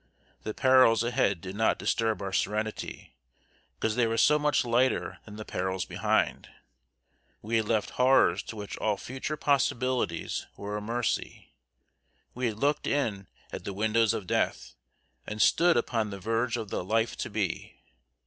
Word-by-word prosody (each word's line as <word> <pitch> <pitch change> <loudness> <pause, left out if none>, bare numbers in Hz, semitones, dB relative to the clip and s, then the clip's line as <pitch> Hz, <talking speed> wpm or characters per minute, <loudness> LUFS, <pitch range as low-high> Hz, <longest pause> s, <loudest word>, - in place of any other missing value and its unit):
The 110 - -5
perils 130 -4 +5
ahead 120 -7 +1
did 95 +2 -7
not 110 +1 +2
disturb 110 -3 0
our 95 -1 -4
serenity, 105 -7 -3 0.6
because 110 -1 -1
they 120 -2 +3
were 115 0 -1
so 150 +5 +5
much 150 -3 +2
lighter 120 +2 +1
than 105 - -10
the 110 0 -7
perils 95 0 -2
behind. - - 0 0.9
We 115 +2 0
had 110 -2 0
left 110 -2 +1
horrors 130 +1 +4
to - - -7
which 105 -2 -6
all 105 -2 0
future 135 +8 -5
possibilities 130 - 0
were 105 +1 -5
a 105 - -3
mercy. 115 +1 -3 0.8
We 125 0 -1
had 110 -2 -3
looked 145 +4 0
in 110 -9 -1 0.3
at - - -5
the 100 - -5
windows 110 +2 +2
of 100 - -5
Death, - - -1 0.5
and 105 - -5
stood 170 - +4
upon 115 -2 0
the 100 -1 -7
verge 115 +5 0
of 110 -4 -6
the - - -2
Life 115 +4 0
To - - -4
Be. 100 -4 -3
110 Hz, 160 wpm, -28 LUFS, 105-125 Hz, 0.9 s, perils